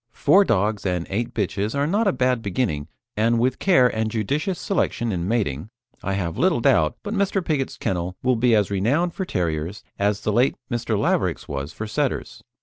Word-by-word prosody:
Four 195 +10 +5
dogs 105 - 0
and 90 -3 -1
eight 115 +4 -1
bitches 105 0 -2
are 140 - +2
not 205 +7 +1
a - - +4
bad 125 -6 +1
beginning, 90 - -2 0.3
and 115 +2 +2
with 125 +3 +1
care 135 -10 +5
and 110 -2 -1
judicious 140 - -1
selection 120 - -1
in 90 -2 -2
mating, 100 - -1 0.3
I 100 +2 -2
have 90 -4 -2
little - - +3
doubt 75 -1 +3
but 210 - -4
Mr. 195 -3 0
Pigott's 140 -4 -1
kennel 90 0 -2
will 130 0 +3
be 120 0 +3
as 105 -2 +1
renowned 140 - +1
for 190 - -3
Terriers 85 - -2 0.2
as 100 0 +1
the 105 - -1
late 125 +5 +3 0.2
Mr. 120 -2 -1
Laverack's - - 0
was 70 +1 -4
for 110 - -6
Setters. 105 - -2
110 Hz, 190 wpm, -23 LUFS, 95-130 Hz, 0.3 s, Four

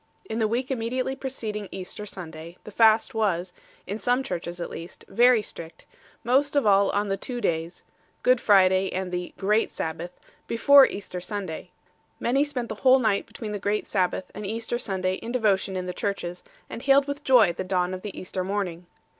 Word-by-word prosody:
In 225 -10 -4
the 220 - +2
week 245 +5 -2
immediately 255 +2 -1
preceding 220 -7 -5
Easter 190 +2 -6
Sunday 165 -3 -9
the 215 - -10
fast 220 +1 +4
was 185 -5 0 0.3
(in 205 +3 -4
some 245 +3 +1
Churches 175 -6 -5
at 170 - -5
least) 165 +1 -9
very 240 +2 +4
strict, 165 -4 -10 0.4
most 275 +5 +2
of 285 - +3
all 200 -1 +5
on 205 0 0
the 195 - 0
two 245 +5 -5
days 165 -4 -2 0.4
Good 250 -1 +4
Friday 190 -2 +4
and 185 0 -3
the 180 0 -3
"Great 210 +3 +2
Sabbath" 165 +2 -5 0.3
before 275 +4 +7
Easter 190 -2 -6
Sunday 190 -4 -5
6. 180 - -31 0.5
Many 270 +4 +2
spent 260 -5 -4
the 215 - -4
whole 260 0 +7
night 220 -6 +1
between 220 -3 -7
the 205 - -3
Great 205 +2 -1
Sabbath 185 -1 -1
and 210 - -7
Easter 225 +3 -3
Sunday 190 -4 -1
in 230 - -7
devotion 200 -6 +1
in 185 0 -3
the 180 - -4
churches 180 -3 -3
7, - - -26 0.2
and 230 - -6
hailed 275 +1 +4
with 285 +1 -4
joy 250 - +5
the 185 - -4
dawn 185 -1 0
of 185 - -5
the 205 -1 -7
Easter 185 0 -4
morning. 180 -3 -3
205 Hz, 195 wpm, -25 LUFS, 185-240 Hz, 0.5 s, before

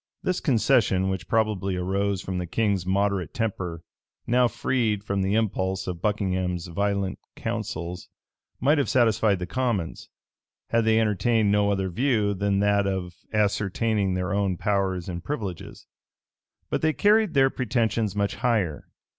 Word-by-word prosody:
This 185 - 0
concession, 110 - +2
which 95 -4 -3
probably 105 -4 0
arose 95 +2 -1
from 95 -1 -3
the 90 - -4
king's 100 -2 0
moderate 100 -1 0
temper, 90 -7 -3 0.4
now 125 +1 +3
freed 110 -4 -1
from 100 -2 -1
the 95 +2 +1
impulse 95 -4 0
of 90 -2 -5
Buckingham's 95 -4 -1
violent 100 +2 -1 0.2
counsels, 85 +3 -4 0.5
might 145 +5 +3
have 135 - 0
satisfied 110 -4 +3
the 90 - -4
commons, 115 -5 -2 0.6
had 115 -1 +2
they 110 0 +4
entertained 110 0 +2
no 105 0 +3
other 95 -2 -1
view 110 -1 +1
than 100 0 0
that 100 -1 +2
of 95 -2 -3 0.2
ascertaining 105 -1 +1
their 90 +2 -2
own 100 -3 0
powers 95 -2 0
and 85 -2 -5
privileges. 100 - -5 0.9
But - - 0
they 155 0 +2
carried 210 -1 +3
their 135 -1 +5
pretensions 115 -4 0
much 100 0 -1
higher. 105 -11 0
100 Hz, 145 wpm, -25 LUFS, 95-115 Hz, 0.9 s, their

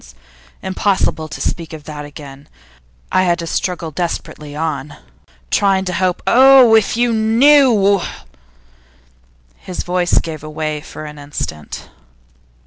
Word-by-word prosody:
Impossible 190 -4 0
to - - -8
speak 165 -2 -3
of 155 -2 -9
that 150 -1 -7
again; 145 -1 -12 0.6
I 185 - +3
had 175 -2 +2
to 170 - -5
struggle 170 -1 -3
desperately 150 -3 -5
on, 150 -2 -4 0.5
trying 195 -1 +2
to 180 - -3
hope. 180 +1 -1
Oh! 260 -2 +7
if 220 0 +3
you 240 -1 +2
knew 225 -3 +4 0.8
' - - -34
His 185 - -6
voice 180 -1 0
gave 160 -2 -2
way 155 0 -4
for 155 0 -9
an 150 -1 -9
instant. 140 - -6
165 Hz, 130 wpm, -17 LUFS, 150-195 Hz, 0.8 s, Oh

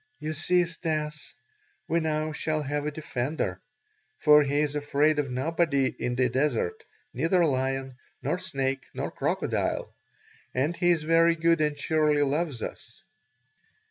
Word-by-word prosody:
"You 155 +1 -3
see, 175 +3 +2
Stas; 155 -6 -4 0.5
we 170 - +2
now 155 -1 -1
shall 155 0 -1
have 145 +1 -2
a - - -1
defender. 135 - -3 0.6
For 150 -1 +6
he 145 +1 +1
is 150 -1 0
afraid 150 +1 +2
of 140 -2 -1
nobody 140 +1 +1
in 125 - -1
the 125 0 +3
desert 130 -7 0 0.3
neither 165 +6 +2
lion, 135 -2 -1 0.3
nor 180 - -1
snake, 135 -7 -2
nor - - -3
crocodile. - - -1 0.6
And 145 +7 +1
he 175 +1 +2
is 165 -3 +3
very 165 +1 +4
good 165 0 +2
and 150 -1 +1
surely 150 0 +2
loves 145 -2 -1
us." - - -9
150 Hz, 140 wpm, -27 LUFS, 135-160 Hz, 0.6 s, For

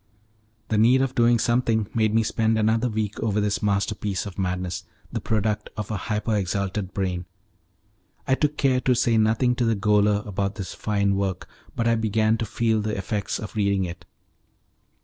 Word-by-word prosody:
The 110 - +2
need 125 +4 +5
of 135 -1 -2
doing 120 -1 +4
something 115 -2 +1
made 110 -2 +2
me 115 +1 +3
spend 110 0 +1
a 110 +3 +2
week 110 -2 -3
over 105 -2 0
this 105 -1 0
masterpiece 100 -1 -1
of 100 -1 -8
madness, 90 0 -2 0.3
the - - -3
product 105 -1 -1
of 105 0 -4
a - - -1
hyper 105 +1 0
exalted 100 0 -2
brain. 90 -2 -2 1.0
I 130 - +3
took 150 +2 0
care 130 -2 +2
to 130 -1 +2
say 115 0 +2
nothing 115 +3 +2
to 125 - +1
the 115 -1 +2
gaoler 105 0 +2
about 100 -1 -2
this 100 -4 -6
fine 100 -2 0
work, 95 -2 -2 0.3
but 115 - 0
I 115 - +4
began 110 0 +1
to 115 - -2
feel 110 +1 +1
the 105 0 -2
effects 100 +1 -2
of 110 - -8
reading 100 -2 +1
it. 90 0 -8
105 Hz, 180 wpm, -24 LUFS, 100-115 Hz, 1.0 s, need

